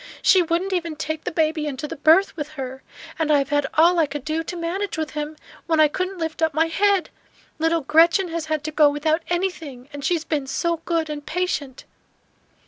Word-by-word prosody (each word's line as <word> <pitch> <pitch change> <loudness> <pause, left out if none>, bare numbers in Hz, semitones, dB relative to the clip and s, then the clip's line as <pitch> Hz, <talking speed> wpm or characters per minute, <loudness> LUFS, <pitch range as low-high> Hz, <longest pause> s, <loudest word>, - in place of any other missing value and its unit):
She 375 - +6
wouldn't 350 +3 -1
even 335 -3 -2
take 315 0 -4
the - - -2
baby 315 -1 0
into 280 +1 -4
the - - -6
berth 320 +7 +4
with 305 -1 -6
her; 265 0 -6 0.4
and 320 -1 0
I 295 - +6
have 275 -1 -1
had 290 -1 +1
all 340 +3 +5
I 315 - +3
could 285 -2 -6
do 315 +1 -1
to 355 - -6
manage 355 +4 -3
with 315 -1 -3
him, 300 +1 -4 0.3
when 320 -2 +2
I 310 - +7
couldn't 370 +5 -3
lift 325 -1 -4
up 320 -2 +1
my 320 +1 +3
head. 390 +3 +1 0.5
Little 325 +1 +2
Gretchen 335 +5 +4
has 330 -1 -4
had 310 -1 -1
to 310 - -4
go 300 -1 +5
without 310 +3 0
anything; 325 -8 -3
and 285 -1 -7
she 355 - +2
has 320 - -3
been 295 -4 -2
so 335 +4 -1
good 330 -2 0
and 300 -1 -6
patient!" 310 -6 -3
315 Hz, 220 wpm, -22 LUFS, 295-340 Hz, 0.5 s, I